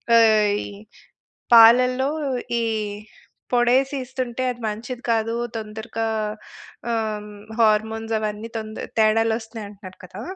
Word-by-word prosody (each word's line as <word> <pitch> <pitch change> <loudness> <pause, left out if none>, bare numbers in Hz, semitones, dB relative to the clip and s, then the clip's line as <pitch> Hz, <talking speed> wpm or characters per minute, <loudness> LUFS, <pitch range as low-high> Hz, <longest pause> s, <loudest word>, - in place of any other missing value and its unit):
ఆహ్, 215 -2 +5
ఈ - - -7 0.9
పాలల్లో 250 +4 +6 0.5
ఈ - - 0 0.9
పొడేసి 255 +3 +3
ఇస్తుంటే, 255 -1 -4
అది 240 - -15
మంచిది 240 +4 -6
కాదు, 225 0 0 0.2
తొందరగా 220 +1 -5 0.9
ఆహ్, 215 -2 -3 0.3
హార్మోన్సవన్నీ 220 0 0
తొంద 215 0 -7 0.2
తేడాలొస్తున్నయి 225 0 +1
అంటన్నారు 190 -2 -12
కదా! 195 +5 -9
225 Hz, 95 wpm, -22 LUFS, 215-240 Hz, 0.9 s, పాలల్లో